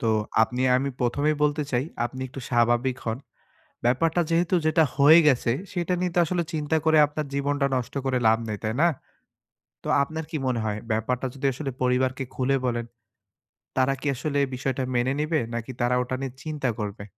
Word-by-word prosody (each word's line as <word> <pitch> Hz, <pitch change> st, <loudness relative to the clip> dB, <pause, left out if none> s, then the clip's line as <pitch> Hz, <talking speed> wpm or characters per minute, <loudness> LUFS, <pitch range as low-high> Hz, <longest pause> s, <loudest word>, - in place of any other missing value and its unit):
তো 115 Hz, -, -1 dB, 0.4 s
আপনি 125 Hz, +3 st, -1 dB, 0.2 s
আমি 135 Hz, +2 st, 0 dB
প্রথমেই 145 Hz, +5 st, +1 dB
বলতে 150 Hz, 0 st, +2 dB
চাই, 125 Hz, +2 st, +1 dB, 0.2 s
আপনি 130 Hz, +2 st, -5 dB
একটু 135 Hz, -, -8 dB
স্বাভাবিক 120 Hz, +2 st, +2 dB
হন। 115 Hz, +1 st, -2 dB, 0.7 s
ব্যাপারটা 160 Hz, +8 st, +2 dB
যেহেতু 170 Hz, +2 st, +2 dB
যেটা 155 Hz, +1 st, +4 dB
হয়ে 150 Hz, +4 st, +8 dB
গেছে 125 Hz, -3 st, +2 dB, 0.2 s
সেটা 180 Hz, 0 st, -1 dB
নিয়ে 180 Hz, -1 st, -1 dB
তো -, -, +1 dB
আসলে 175 Hz, +1 st, -1 dB
চিন্তা 155 Hz, +1 st, 0 dB
করে 160 Hz, -1 st, +4 dB
আপনার 150 Hz, 0 st, -4 dB
জীবনটা 140 Hz, 0 st, 0 dB
নষ্ট 125 Hz, +1 st, -4 dB
করে 130 Hz, -1 st, +1 dB
লাভ 110 Hz, -, +4 dB
নেই। 105 Hz, -1 st, -3 dB
তাই 110 Hz, +1 st, -1 dB
না? 170 Hz, -, +6 dB, 1.0 s
তো -, -, -7 dB, 0.2 s
আপনার 160 Hz, +2 st, -5 dB
কি 155 Hz, -, -1 dB
মনে 125 Hz, -3 st, 0 dB
হয় 105 Hz, -1 st, -2 dB
ব্যাপারটা 120 Hz, +4 st, -1 dB
যদি 140 Hz, 0 st, -6 dB
আসলে 135 Hz, 0 st, -4 dB
পরিবারকে 130 Hz, +1 st, +1 dB
খুলে 135 Hz, +1 st, +1 dB
বলেন, 120 Hz, -1 st, -1 dB, 0.9 s
তারা 130 Hz, +1 st, +3 dB
কি -, -, -7 dB
আসলে 145 Hz, +3 st, -3 dB
এই -, -, -5 dB
বিষয়টা 130 Hz, +1 st, -2 dB
মেনে 120 Hz, +2 st, +1 dB
নিবে 155 Hz, -1 st, +1 dB
নাকি 115 Hz, +2 st, -4 dB
তারা 120 Hz, +1 st, +2 dB
ওটা 125 Hz, +1 st, -4 dB
নিয়ে 135 Hz, -2 st, -4 dB
চিন্তা 150 Hz, -4 st, -2 dB
করবে? 100 Hz, -1 st, -5 dB
130 Hz, 185 wpm, -25 LUFS, 120-150 Hz, 1.0 s, হয়ে